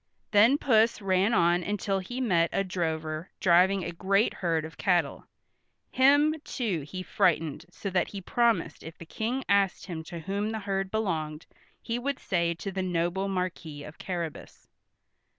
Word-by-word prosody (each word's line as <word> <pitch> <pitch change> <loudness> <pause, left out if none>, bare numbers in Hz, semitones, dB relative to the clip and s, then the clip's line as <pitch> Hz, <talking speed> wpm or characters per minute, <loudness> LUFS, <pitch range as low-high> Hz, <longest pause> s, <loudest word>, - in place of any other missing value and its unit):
Then 225 +7 +6
Puss 230 -5 +3
ran 195 +1 +2
on 175 -4 +3
until 195 0 -1
he 245 +7 -6
met 175 -9 +2
a 195 - +1
drover 160 -3 -3
driving 185 +2 +4
a - - -3
great 195 +5 +1
herd 165 -3 -1
of 160 -1 -10
cattle. 175 -7 0 0.6
Him, 285 +4 +5
too, 205 - -2
he 185 +6 -7
frightened 165 -4 +1
so 195 +2 -6
that 180 -1 +1
he 200 - -7
promised 200 -5 0
if 160 +1 -10
the 165 - -10
King 235 +9 -3
asked 200 -2 +2
him 165 -4 -6
to 170 - -7
whom 200 +5 -2
the 220 - -3
herd 195 -1 -2
belonged, 165 -8 -2 0.4
he 230 +1 -2
would 275 +2 -2
say 170 -2 0
to 195 +4 -5
the 190 - -2
noble 180 +1 -1
Marquis 180 -6 -4
of 150 +1 -11
Carrabas. 170 -4 -6
185 Hz, 165 wpm, -28 LUFS, 170-205 Hz, 0.6 s, Then